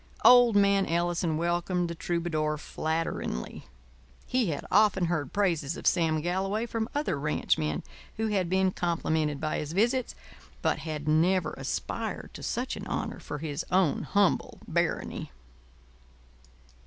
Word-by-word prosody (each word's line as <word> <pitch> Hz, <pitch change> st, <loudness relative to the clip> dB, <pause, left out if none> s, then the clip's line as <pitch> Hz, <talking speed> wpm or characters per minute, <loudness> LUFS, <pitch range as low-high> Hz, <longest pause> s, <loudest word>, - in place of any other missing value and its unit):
Old 245 Hz, -3 st, +8 dB
man 200 Hz, -1 st, +4 dB
Ellison 170 Hz, -1 st, 0 dB
welcomed 175 Hz, +1 st, 0 dB
the 170 Hz, -, -4 dB
troubadour 165 Hz, -3 st, -1 dB
flatteringly. 160 Hz, -, -3 dB, 0.6 s
He 250 Hz, -4 st, +1 dB
had 150 Hz, -4 st, -3 dB
often 205 Hz, -3 st, +4 dB
heard 160 Hz, -6 st, -1 dB
praises 170 Hz, -7 st, 0 dB
of -, -, -9 dB
Sam 160 Hz, -3 st, +2 dB
Galloway 195 Hz, +6 st, -1 dB
from 230 Hz, -1 st, -3 dB
other 290 Hz, -, 0 dB
ranchmen 80 Hz, -, 0 dB, 0.3 s
who 220 Hz, 0 st, 0 dB
had 190 Hz, -4 st, 0 dB
been 190 Hz, 0 st, +2 dB
complimented 160 Hz, -4 st, -1 dB
by 155 Hz, -1 st, -1 dB
his 150 Hz, +1 st, -5 dB
visits, 240 Hz, +6 st, +1 dB, 0.5 s
but -, -, +1 dB
had 155 Hz, -2 st, -5 dB
never 165 Hz, +2 st, +3 dB
aspired 135 Hz, 0 st, -4 dB
to -, -, -9 dB
such -, -, -2 dB
an -, -, -7 dB
honour -, -, -3 dB
for 150 Hz, -, -6 dB
his 150 Hz, +1 st, -4 dB
own 180 Hz, -5 st, +2 dB
humble 200 Hz, -2 st, +1 dB
barony. -, -, -1 dB
175 Hz, 135 wpm, -28 LUFS, 155-195 Hz, 0.6 s, Old